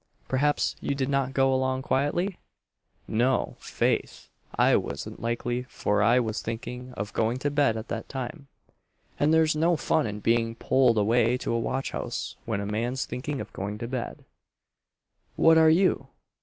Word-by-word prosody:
"Perhaps 145 +3 +1
you 140 - -1
did 135 -1 -1
not 135 -2 +1
go 135 -1 +3
along 130 0 0
quietly?" 170 +9 0 0.7
"No, 125 +4 +1
'faith, - - -1 0.3
I - - +4
wasn't - - -3
likely, 120 +1 -1
for 105 0 0
I 115 +4 +5
was 110 -3 -2
thinking 125 +2 -6
of 105 -1 -5
going 115 +2 +1
to 145 +2 -1
bed 140 -6 +2
at 110 - -6
that 115 -1 -4
time; 140 +3 -6 0.7
and 145 +2 +3
there's 160 -1 +4
no 165 +3 +3
fun 150 -3 +1
in 105 0 -5
being 115 +1 +1
pulled 125 -1 +3
away 115 +3 +3
to 125 - -3
a 115 - +1
watch 135 +3 -2
house - - -4
when 110 -3 -2
a - - -3
man's 120 +5 -2
thinking 140 +2 -4
of - - -7
going 100 +2 -4
to 115 - -5
bed." 125 -1 -5 1.1
"What 165 0 +6
are 160 0 +6
you? 180 +4 +3
125 Hz, 170 wpm, -27 LUFS, 115-140 Hz, 1.1 s, What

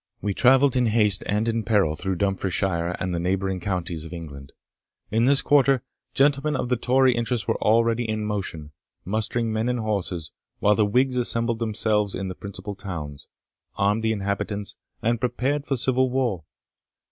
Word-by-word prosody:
We 105 - -2
travelled 135 +4 +4
in 125 -2 +3
haste 105 -2 +3
and 105 +2 0
in 115 0 0
peril 100 -7 +2
through 95 +5 -2
Dumfriesshire 95 -2 -1
and 95 -1 -2
the 85 - -1
neighbouring 95 +1 -1
counties 90 -3 -3
of 80 - -10
England. 70 -5 -9 0.6
In 115 +2 +3
this 140 +2 +4
quarter, 135 -3 +4 0.3
gentlemen 145 +2 +2
of 125 - -2
the 125 - +3
Tory 130 +2 +3
interest 120 -1 -2
were - - -1
already 115 +1 +2
in 110 -1 -1
motion, 95 -8 -4 0.3
mustering 110 +3 -1
men 110 +2 0
and 125 -1 -1
horses, 95 -7 -2 0.3
while 105 - +3
the 105 0 +2
Whigs 125 +4 +2
assembled 115 -1 0
themselves 105 -2 0
in 95 0 -3
the - - -4
principal 100 +2 -7
towns, 85 -9 -7 0.5
armed 105 +3 +1
the 110 0 +1
inhabitants, 100 0 -2 0.3
and 115 +1 +1
prepared 130 +4 -1
for 135 - 0
civil 130 +1 +2
war. 120 -10 -1
110 Hz, 170 wpm, -24 LUFS, 95-120 Hz, 0.6 s, travelled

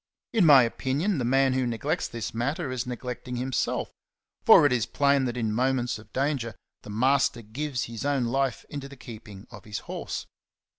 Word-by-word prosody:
In 210 -8 +4
my 140 -4 +9
opin 130 +4 -2
ion, 195 -4 +1
the - - -1
man 135 +2 +3
who 130 -1 +1
neglects 145 +9 -1
this 115 -1 -5
matter 135 +5 -2
is 125 -1 -3
neglecting 125 0 -5
himself; 130 0 -1 0.5
for - - +8
it 145 - +4
is 120 -3 +1
plain 140 -1 +2
that 120 -1 -3
in 110 -3 -1
moments 125 -1 0
of 110 -1 -16
danger 130 -5 -1 0.3
the - - -12
master 125 +2 +2
gives 130 +4 -3
his 115 -1 -6
own 140 -3 +1
life 135 +2 -1
into 140 -1 -7
the 140 - -12
keeping 110 -4 -11
of 105 -4 -11
his 105 0 -5
horse. - - -5
125 Hz, 190 wpm, -27 LUFS, 115-140 Hz, 0.5 s, my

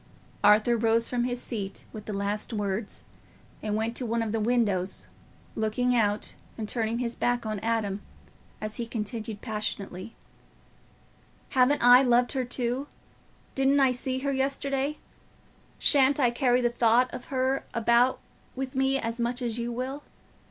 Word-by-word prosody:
Arthur 210 +3 +5
rose 230 +1 +2
from 245 -1 -1
his 245 0 -2
seat 205 -6 -5
with 215 -1 -8
the - - -5
last 200 +2 -3
words, 205 0 -3 0.6
and 210 -1 -2
went 225 +2 -1
to - - -1
one 230 -1 0
of 220 - -3
the 225 - 0
windows, 210 -5 +1 0.5
looking 235 +3 0
out 210 -3 0 0.2
and 220 -2 -4
turning 225 0 -1
his 240 -1 -2
back 245 -1 0
on 215 -1 -2
Adam, 215 -2 -1 0.6
as 215 0 -5
he 235 - -3
continued, 220 -1 -5
passionately, 210 -2 -5 1.3
"Haven't 260 +2 +3
I 245 +1 +9
loved 245 -1 +3
her 260 -2 -1
too? 245 +3 -1 0.7
Didn't 270 +1 +3
I 265 -2 +5
see 255 +1 -2
her 280 0 -1
yesterday? 275 +1 -1 0.8
Shan't 280 0 +4
I 245 -4 +4
carry 250 0 +2
the 240 -1 +1
thought 240 +1 +3
of 245 - -7
her 265 0 0
about 235 +2 +3 0.4
with 265 0 -4
me 270 +1 +2
as 230 -2 -3
much 240 +1 -1
as 235 -1 -2
you 235 0 -2
will? 260 +4 -4
235 Hz, 155 wpm, -27 LUFS, 220-255 Hz, 1.3 s, I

